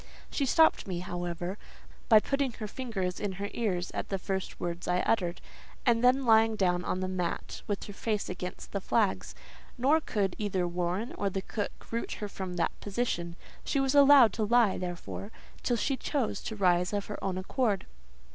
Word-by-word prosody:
She 275 - 0
stopped 320 -1 +4
me, 175 -2 -3
however, 175 +1 -4 0.5
by 220 -2 +9
putting 275 +2 -1
her 215 -1 -5
fingers 205 -7 -3
in 205 -2 -2
her 200 +2 -4
ears 185 -6 -1
at - - -4
the 195 - 0
first 190 0 -4
words 175 0 -4
I 180 0 +2
uttered, 175 -6 0 0.4
and 235 -2 +3
then 255 +2 +4
lying 225 -1 +5
down 180 -3 +1
on 185 - -2
the 185 - -1
mat 180 -2 -3
with 205 -2 -2
her 205 - -8
face 210 0 -2
against 180 0 -6
the 200 - -2
flags; 210 0 0 0.4
nor 285 +6 +4
could 200 - -1
either 190 -4 0
Warren 180 +6 -2
or 200 - +1
the 195 0 -3
cook 205 0 -5
root 230 0 -2
her 210 - -4
from 190 -2 -5
that 170 - +1
position: 195 -6 -2 0.3
she 280 - 0
was 270 0 +2
allowed 280 -4 +8
to 220 - -1
lie, 230 -2 +3
therefore, 180 +3 -5 0.3
till 240 - +1
she 270 +4 0
chose 270 -5 -1
to 220 - -4
rise 180 -1 +2
of 205 -1 -1
her 210 - -7
own 190 -1 -1
accord. 205 +2 0
200 Hz, 185 wpm, -30 LUFS, 180-235 Hz, 0.5 s, by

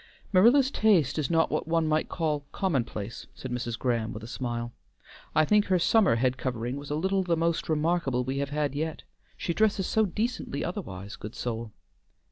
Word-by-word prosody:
"Marilla's 245 +8 +6
taste 185 - +3
is 145 - -1
not 165 -1 +2
what - - -1
one 165 0 +2
might 155 0 +1
call 150 -4 -1
commonplace," 120 - -2
said 130 - -7
Mrs. 120 -1 -3
Graham, 115 -3 -1
with 110 - -8
a - - -7
smile. 120 -1 -4 0.6
"I 155 - +5
think 210 +4 +4
her 185 - +3
summer 195 - +4
head 130 +2 +1
covering 125 0 -2
was 145 0 -8
a 150 - -1
little 190 +5 +1
the 175 -3 0
most 165 0 0
remarkable 155 -5 +1
we 135 +2 -2
have 140 0 -1
had 145 -1 -1
yet. 155 +2 -3 0.3
She 170 - -2
dresses 205 -1 +2
so 220 +2 +2
decently 215 - -2
otherwise, 100 - -6
good 105 +2 -8
soul!" 115 -2 -4
150 Hz, 185 wpm, -28 LUFS, 125-180 Hz, 0.6 s, Marilla's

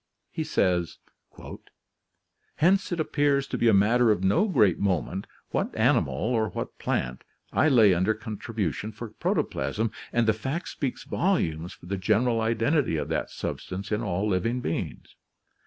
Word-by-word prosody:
He - - -3
says: 90 -2 0 1.6
"Hence 190 +5 +2
it 175 - -2
appears 145 -3 +1
to - - -5
be 120 - +2
a 110 - +6
matter 115 +4 +4
of 105 -3 +2
no 100 - +3
great 110 - +3
moment 95 0 -1 0.2
what - - -1
animal, 70 - +2
or 110 - 0
what - - -6
plant, 65 0 -2 0.3
I 155 - +4
lay 110 -8 +6
under 95 +5 +1
contribution 105 - -4
for 115 +2 -7
protoplasm, 110 0 -1 0.2
and 120 -1 +2
the 110 - +5
fact 135 - -4
speaks 135 -4 -4
volumes 85 - -1
for - - -16
the 100 +2 -3
general 115 +5 +2
identity 115 - +1
of - - -3
that - - -1
sub - - -4
stance 100 +3 -6
in 105 +1 0
all 100 -1 -1
living 115 +5 0
beings. 85 -9 -4
110 Hz, 155 wpm, -26 LUFS, 95-125 Hz, 1.6 s, a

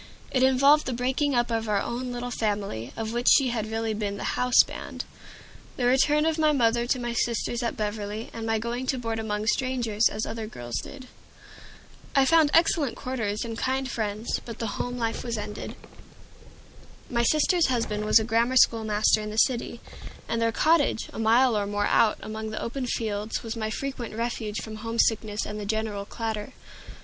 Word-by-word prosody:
It 255 - +1
involved 275 +3 +5
the 260 - -1
breaking 260 +3 0
up 240 0 +1
of 225 -1 -1
our 205 -1 +2
own 245 +4 -3
little 245 0 -4
family, 205 - -2
of 225 0 -3
which 240 +1 -2
she 270 -3 +5
had 220 -2 -2
really 225 0 -1
been 205 -1 -3
the - - -2
"houseband," 250 -1 +2 0.7
the 245 - 0
return 295 +4 +3
of 320 0 0
my 310 -1 +4
mother 235 -3 +2
to 255 - +1
my 240 -1 -3
sisters 235 +1 -1
at 235 - -2
Beverly, 210 +1 -4
and 225 -1 -5
my 225 0 +2
going 235 +3 -3
to 265 - 0
board 230 -2 -3
among 210 -1 -2
strangers, 235 -3 +1
as 215 +1 -3
other 220 -1 -5
girls 120 - -5
did. 265 -2 -8 1.1
I 275 -1 +5
found 320 +1 +5
excellent 320 -5 +3
quarters 235 -5 -3
and 230 -1 -5
kind 265 +2 -1
friends, 220 -2 -3
but 230 -2 -8
the 225 -3 -3
home 245 0 -4
life 230 -2 -2
was 235 -2 -3
ended. 210 0 -6 1.3
My 235 -2 0
sister's 310 +7 +3
husband 225 -5 -1
was 215 - +5
a 220 - +3
grammar 235 +3 +2
school 230 -2 +5
master 215 0 +2
in 210 - -5
the 215 - -6
city, 235 0 +1 0.5
and 230 0 -1
their 230 0 +2
cottage, 300 -1 +2
a - - -6
mile 230 +2 +4
or 205 -1 0
more 205 0 0
out, 215 0 +3
among 220 0 -5
the 215 - -4
open 250 +2 -3
fields, 215 -2 -2
was 225 0 -4
my 220 -1 -2
frequent 245 -2 -5
refuge 225 -2 -3
from 215 -1 -7
homesickness 220 -1 0
and 210 0 -5
the 205 - -5
general 215 -2 -2
clatter. 220 +2 -4
230 Hz, 190 wpm, -26 LUFS, 215-250 Hz, 1.3 s, involved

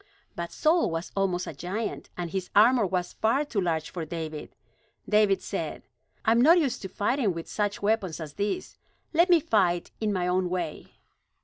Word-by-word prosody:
But 170 0 -5
Saul 325 +2 +2
was 165 +1 -4
almost 185 -2 0
a - - -6
giant, 190 +9 -4
and 175 -2 -4
his 190 -2 -3
armor 220 +1 +6
was 180 -1 -2
far 250 +7 +1
too 220 -8 -1
large 165 -3 -1
for 175 - -4
David. 155 -1 -6 0.5
David 210 -2 +3
said: - - -4 0.4
"I 220 - +4
am 230 +1 +4
not 325 +7 +7
used 290 -7 0
to 190 - -6
fighting 210 -1 0
with 165 - -6
such 205 -1 -2
weapons 200 -6 0
as 155 -3 -7
these. 210 - -3 0.3
Let 340 +3 +4
me 345 -2 +7
fight 180 - +1
in 215 -1 0
my 180 -3 0
own 180 0 +1
way." 175 -4 -4
195 Hz, 185 wpm, -27 LUFS, 175-225 Hz, 0.5 s, not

